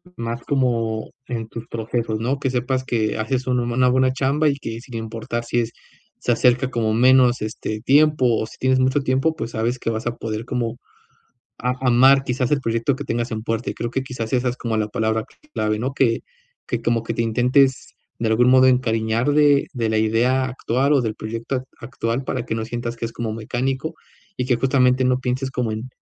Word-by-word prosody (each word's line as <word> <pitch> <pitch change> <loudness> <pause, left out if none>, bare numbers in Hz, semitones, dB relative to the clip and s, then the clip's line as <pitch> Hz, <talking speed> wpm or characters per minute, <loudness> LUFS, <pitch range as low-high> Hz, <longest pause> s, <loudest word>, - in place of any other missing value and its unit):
más 115 0 -4
como 115 -5 0 0.2
en 115 -2 -4
tus 115 0 -8
procesos, 115 -1 -2
¿no?, 130 +5 -1
que 135 -2 0
sepas 130 +1 -1
que 110 -4 0
haces 130 +4 -1
una 125 -1 +1
buena 125 +1 +2
buena 130 0 +3
chamba 140 +4 +1
y 140 - +2
que, 115 -5 -6
sin 120 0 -11
importar 115 +1 -4
si 120 0 0
es 115 -1 -1 0.5
se - - -1
acerca 125 +2 +3
como 110 -3 0
menos, 125 +1 +5
este, 110 0 -4
tiempo 150 +2 +4 0.2
o - - -1
si - - -14
tienes 130 0 +2
mucho 130 +2 +2
tiempo, 135 +4 +1
pues, 115 -5 -5
sabes 115 +3 -1
que - - -2
vas 110 +1 -3
a 120 - -2
poder 110 0 -4
como 120 -2 -2 0.8
a 125 0 -1
amar, 130 +2 +5
quizás, 125 -1 -1
el 145 -2 +2
proyecto 115 +3 0
que 145 - -6
tengas 120 -1 -2
en 110 -1 -3
puerta. 115 +1 -2
Y - - -3
creo 120 - -4
que 130 +2 -2
quizás, 120 -4 -5
esa 125 0 +2
es 120 - -4
como 115 -2 -2
la 105 -1 0
palabra 110 +1 -1 0.3
clave, 105 0 0
¿no?, 130 +4 -2
que 125 -4 +2 0.5
que, 120 -2 -2
como 115 -1 0
que - - -3
te - - -1
intentes, 125 +4 +2 0.3
de 115 - 0
algún 120 +3 +4
modo, 130 0 +6
encariñar 115 0 +1
de 145 -1 +4
de 115 -3 -1
la 110 - +1
idea 120 +4 +2
actual 130 +2 0
o 140 - +4
del 110 -2 -2
proyecto 115 +4 -4
ac 130 - -2 0.2
actual 130 -1 -3
para 125 -2 -3
que 110 - -2
no 110 - -2
sientas 120 0 -4
que 115 - -9
es 115 - -5
como 115 -2 -4
mecánico 130 +7 -3 0.4
y 125 - -1
que, 125 -1 +2
justamente, 130 0 +3
no 125 0 +2
pienses 130 +1 -2
como 125 -4 -1
en 115 +4 -6
120 Hz, 215 wpm, -22 LUFS, 115-130 Hz, 0.8 s, modo